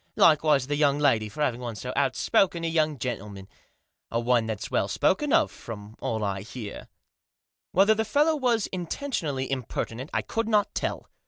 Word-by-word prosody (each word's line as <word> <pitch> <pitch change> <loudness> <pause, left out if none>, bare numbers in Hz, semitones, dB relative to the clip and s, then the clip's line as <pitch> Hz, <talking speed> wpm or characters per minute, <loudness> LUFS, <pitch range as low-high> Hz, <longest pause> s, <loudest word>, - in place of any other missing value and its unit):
Likewise 150 -4 +4
the 145 +2 -1
young 145 -1 +3
lady, 115 -8 +2
for 150 +8 -3
having 125 -4 -1
won 120 -3 -5
so 125 +4 -5
outspoken 165 - +2
a 165 - -1
youngf, 155 -2 +2
gentleman; 105 -6 -5 0.6
and 115 0 -2
one 120 -2 +3
that's 110 -3 -4
well - - +1
spoken - - +1
of, - - +4
from 105 -1 -9
all 110 -1 -2
I 100 -1 -2
beSr." 110 0 -8 0.8
Whether 200 +4 +5
the 220 +1 0
fellow 295 +8 +2
was 245 -7 +1
intentionally 170 - -3
impertinent 130 0 -4
I - - 0
could 225 0 -2
not 210 -2 +2
tell. - - -3
140 Hz, 170 wpm, -26 LUFS, 115-175 Hz, 0.8 s, Whether